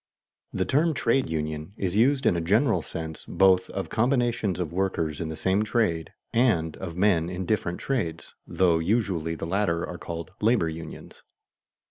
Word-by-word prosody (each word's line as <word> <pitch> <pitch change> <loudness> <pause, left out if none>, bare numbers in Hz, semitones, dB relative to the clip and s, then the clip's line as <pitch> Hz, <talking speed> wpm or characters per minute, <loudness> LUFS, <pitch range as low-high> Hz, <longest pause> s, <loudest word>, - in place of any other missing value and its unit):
_ - - -2
The 95 - +1
term 155 - +2
trade 130 0 +1
union 75 +2 -3
is 95 -1 -2
used 130 +4 +3
in 90 - +4
a 85 - 0
general 100 - +2
sense 80 0 -7
both 95 -1 +3
of 95 - -4
combinations 120 -5 +1
of 85 -3 -3
workers 85 -5 -1
in 80 - -3
the 80 - -4
same 95 +5 +1
trade, 105 - 0 0.2
and 100 -10 +2
of 85 -3 -6
men 90 -4 +3
in 90 +1 -4
different 90 -4 -1
trades, 110 -13 -3
though 85 -3 +2
usually 85 -4 0
the 80 - -5
latter 85 -1 0
are 90 - -7
called 85 0 -6
labor 110 -6 +3
unions. 80 0 -9
95 Hz, 170 wpm, -26 LUFS, 80-110 Hz, 0.2 s, in